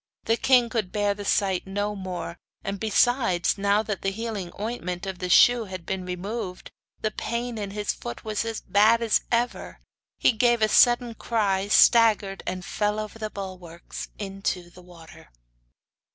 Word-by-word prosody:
The 225 Hz, -, +2 dB
king 250 Hz, 0 st, +4 dB
could 220 Hz, -5 st, -2 dB
bear 205 Hz, -1 st, +1 dB
the 205 Hz, 0 st, -8 dB
sight 195 Hz, -2 st, 0 dB
no 205 Hz, +2 st, -2 dB
more, 180 Hz, -3 st, -6 dB, 0.2 s
and, 195 Hz, 0 st, -4 dB
besides, 220 Hz, -3 st, +2 dB
now 200 Hz, +2 st, +2 dB
that 210 Hz, -3 st, -4 dB
the 195 Hz, -, 0 dB
healing 205 Hz, -3 st, -5 dB
ointment 195 Hz, -5 st, -4 dB
in 190 Hz, -2 st, -5 dB
the 180 Hz, -, -3 dB
shoe 240 Hz, +5 st, +6 dB
had 185 Hz, -3 st, -8 dB
been 190 Hz, -1 st, -3 dB
removed 180 Hz, +1 st, -5 dB, 0.3 s
the 215 Hz, -, -1 dB
pain 235 Hz, +1 st, -4 dB
in 200 Hz, -1 st, -4 dB
his 205 Hz, +1 st, -2 dB
foot 120 Hz, -, -8 dB
was 215 Hz, 0 st, -1 dB
as 225 Hz, -1 st, -4 dB
bad 220 Hz, +3 st, +4 dB
as 225 Hz, -, +2 dB
ever; 240 Hz, +1 st, -1 dB, 0.4 s
he -, -, +4 dB
gave 235 Hz, 0 st, +2 dB
a -, -, +5 dB
sudden 240 Hz, 0 st, +4 dB
cry, 200 Hz, -4 st, 0 dB
staggered, 210 Hz, -2 st, +4 dB
and 185 Hz, 0 st, -4 dB
fell 210 Hz, 0 st, -1 dB
over 215 Hz, +1 st, -6 dB
the 215 Hz, -1 st, -3 dB
bulwarks 185 Hz, -4 st, -8 dB
into 195 Hz, -3 st, -4 dB
the 180 Hz, -, -15 dB
water. 170 Hz, -, -15 dB
205 Hz, 165 wpm, -25 LUFS, 185-225 Hz, 0.4 s, shoe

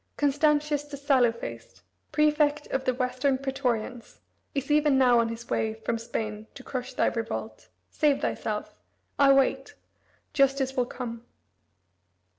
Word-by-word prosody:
Constantius 295 Hz, 0 st, +2 dB
the 290 Hz, -1 st, -8 dB
sallow 265 Hz, -4 st, +3 dB
faced, 115 Hz, -, -9 dB, 0.3 s
prefect 300 Hz, -1 st, +2 dB
of 265 Hz, 0 st, -1 dB
the 255 Hz, -, +2 dB
Western 255 Hz, +1 st, 0 dB
praetorians, 250 Hz, -3 st, -3 dB, 0.4 s
is 275 Hz, +1 st, -2 dB
even 295 Hz, -2 st, +4 dB
now 250 Hz, -2 st, +5 dB
on 230 Hz, 0 st, +1 dB
his 230 Hz, +1 st, -7 dB
way 220 Hz, 0 st, -1 dB
from 225 Hz, +1 st, -3 dB
Spain 220 Hz, -2 st, -4 dB
to 260 Hz, -, -10 dB
crush 255 Hz, -2 st, -5 dB
thy -, -, +2 dB
revolt. 230 Hz, -1 st, -4 dB, 0.2 s
Save 295 Hz, -2 st, +2 dB
thyself. -, -, -3 dB, 0.5 s
I 280 Hz, -1 st, +7 dB
wait. 270 Hz, -1 st, +2 dB, 0.6 s
Justice 275 Hz, -1 st, +2 dB
will 250 Hz, -2 st, +1 dB
come." 235 Hz, -2 st, -6 dB
265 Hz, 135 wpm, -27 LUFS, 235-285 Hz, 0.6 s, I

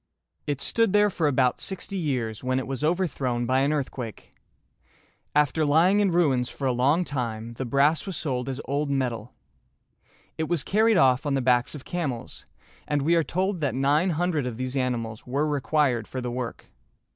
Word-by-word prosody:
It 145 Hz, -2 st, -1 dB
stood 230 Hz, -4 st, +1 dB
there 210 Hz, 0 st, +4 dB
for 165 Hz, -4 st, 0 dB
about 130 Hz, -3 st, +2 dB
sixty 195 Hz, +1 st, -5 dB
years, 125 Hz, -, -2 dB
when 130 Hz, 0 st, 0 dB
it 130 Hz, -, -2 dB
was 135 Hz, 0 st, -4 dB
overthrown 140 Hz, -8 st, 0 dB
by 130 Hz, +2 st, +2 dB
an 140 Hz, +2 st, +2 dB
earthquake. 130 Hz, -6 st, -4 dB, 1.0 s
After 150 Hz, +1 st, +3 dB
lying 165 Hz, +7 st, +4 dB
in 205 Hz, -2 st, +3 dB
ruins 140 Hz, -8 st, +2 dB
for 140 Hz, -, -6 dB
a 130 Hz, -, +3 dB
long 140 Hz, +8 st, +2 dB
time, 115 Hz, -5 st, -4 dB
the 130 Hz, +3 st, -5 dB
brass 145 Hz, -, +2 dB
was 185 Hz, -5 st, -4 dB
sold 130 Hz, -4 st, -2 dB
as 135 Hz, 0 st, -4 dB
old 145 Hz, +1 st, -1 dB
metal. 125 Hz, -4 st, -2 dB, 1.0 s
It 160 Hz, -, -1 dB
was 175 Hz, -5 st, +1 dB
carried 220 Hz, +1 st, +3 dB
off 130 Hz, +1 st, +3 dB
on 140 Hz, -, +1 dB
the -, -, +1 dB
backs 125 Hz, +1 st, +2 dB
of 145 Hz, -, -10 dB
camels, 145 Hz, -10 st, -4 dB, 0.4 s
and 145 Hz, -2 st, 0 dB
we 165 Hz, +4 st, +3 dB
are 165 Hz, -, +4 dB
told 185 Hz, +2 st, -1 dB
that 135 Hz, -5 st, 0 dB
nine 145 Hz, +7 st, +2 dB
hundred 165 Hz, -4 st, 0 dB
of 115 Hz, -3 st, -5 dB
these 130 Hz, +1 st, -3 dB
animals 120 Hz, -4 st, -2 dB
were 140 Hz, +4 st, 0 dB
required 145 Hz, -5 st, +1 dB
for 130 Hz, -, -5 dB
the 125 Hz, -1 st, -3 dB
work. 125 Hz, -1 st, -5 dB
140 Hz, 185 wpm, -26 LUFS, 125-160 Hz, 1.0 s, there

